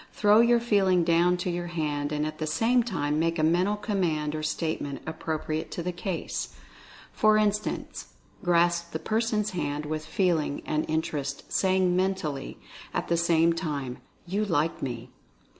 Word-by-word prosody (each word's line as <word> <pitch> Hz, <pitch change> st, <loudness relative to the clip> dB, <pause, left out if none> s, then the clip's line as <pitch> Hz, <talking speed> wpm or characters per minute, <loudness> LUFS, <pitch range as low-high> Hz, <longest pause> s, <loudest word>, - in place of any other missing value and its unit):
Throw 210 Hz, +1 st, +5 dB
your 235 Hz, 0 st, +5 dB
Feeling 195 Hz, -6 st, +3 dB
down 170 Hz, +2 st, +3 dB
to 175 Hz, 0 st, -2 dB
your 175 Hz, 0 st, -3 dB
hand, 150 Hz, -4 st, -2 dB
and 150 Hz, 0 st, 0 dB
at 155 Hz, 0 st, -5 dB
the 155 Hz, -, -2 dB
same 230 Hz, +10 st, +3 dB
time 155 Hz, -10 st, -1 dB
make 165 Hz, +1 st, +1 dB
a 155 Hz, -, +1 dB
mental 180 Hz, +6 st, +3 dB
command 175 Hz, -8 st, -1 dB
or 155 Hz, -, -3 dB
statement 155 Hz, -2 st, -2 dB
appropriate 160 Hz, 0 st, -3 dB
to 170 Hz, -, -4 dB
the 180 Hz, -, -1 dB
case. 175 Hz, 0 st, -4 dB, 0.6 s
For 215 Hz, 0 st, +4 dB
instance, 210 Hz, 0 st, -1 dB, 0.4 s
grasp 170 Hz, -1 st, +2 dB
the -, -, 0 dB
person's 215 Hz, +2 st, 0 dB
hand 150 Hz, -4 st, -2 dB
with 155 Hz, +1 st, -3 dB
Feeling, 165 Hz, -6 st, 0 dB
and 155 Hz, 0 st, -1 dB
interest, 150 Hz, -3 st, -3 dB
saying, 185 Hz, -1 st, +2 dB
mentally, 180 Hz, -7 st, -1 dB, 0.4 s
at -, -, -2 dB
the 170 Hz, -, +3 dB
same 170 Hz, 0 st, +3 dB
time: 145 Hz, -7 st, -4 dB, 0.3 s
"You 195 Hz, +4 st, -1 dB
Like 165 Hz, -5 st, 0 dB
Me." 120 Hz, -3 st, -5 dB
170 Hz, 160 wpm, -27 LUFS, 155-190 Hz, 0.6 s, Throw